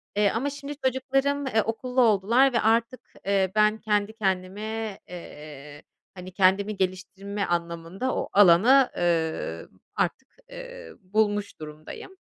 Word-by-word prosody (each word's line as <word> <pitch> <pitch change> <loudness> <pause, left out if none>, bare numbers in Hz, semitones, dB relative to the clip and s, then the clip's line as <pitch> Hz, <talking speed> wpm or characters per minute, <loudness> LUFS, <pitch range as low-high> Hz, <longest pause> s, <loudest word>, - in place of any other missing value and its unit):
eee, 205 0 +3
ama 270 +5 -1
şimdi 285 0 -7
çocuklarım, 270 +2 0
eee, 220 -4 +2
okullu 250 +4 -1
oldular 235 +4 +3
ve 235 - +2
artık, 230 +3 +1 0.2
eee, 195 -2 +1
ben 215 0 +3
kendi 210 -1 -1
kendime, 210 +1 -3
eee, 150 -4 -11 0.3
hani, 185 0 -10
kendimi 195 +2 +2
geliştirme 195 +2 -3
anlamında 170 +7 -3
o - - -3
alanı, 205 +8 +6
ııı, 160 - -1 0.3
artık, 265 +10 -2 0.2
eee, - - -10
bulmuş 205 0 -1
durumdayım. 155 - -10
205 Hz, 120 wpm, -25 LUFS, 185-245 Hz, 0.3 s, alanı